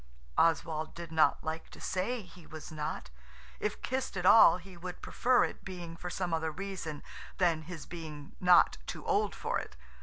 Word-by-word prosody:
Oswald 160 -1 +1
did 170 -1 -7
not 160 -1 +3
like 160 0 -4
to - - -13
say 215 +5 -1
he 180 -2 -15
was 155 0 -9
not. 150 - -4 0.5
If 210 - -3
kissed 260 -6 -2
at 180 - -2
all 185 -4 +8
he 185 +1 -12
would 180 +1 -8
prefer 250 0 +3
it - - -4
being 175 -3 -7
for 180 +1 -6
some 175 -1 -2
other 160 0 0
reason 180 -4 -5 0.3
than 170 -4 +2
his 160 -1 -8
being 155 -4 -8
not 180 -1 +6
too - - -6
old 435 -1 +1
for - - -1
it. - - -9
175 Hz, 180 wpm, -32 LUFS, 160-190 Hz, 0.5 s, all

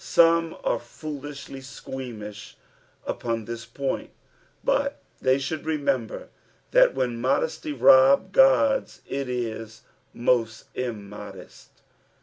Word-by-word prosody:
Some 165 -1 +4
are 120 - +1
foolisUlj 145 +1 -8
squeamish 120 -6 -8 0.5
upoa 115 -2 -2
this 115 +1 -6
point, 140 -1 -3 0.5
but - - +1 0.2
they 130 0 +4
should 145 +3 -3
remember 145 -7 -1 0.4
that - - +5
when 120 -2 -1
modesty 415 - 0
loln 140 - +6
God 270 +3 +5 0.2
it 135 -1 -3
is 115 -2 -4 0.3
most 115 -2 0
immodest. 105 -5 -8
130 Hz, 100 wpm, -25 LUFS, 115-155 Hz, 0.5 s, loln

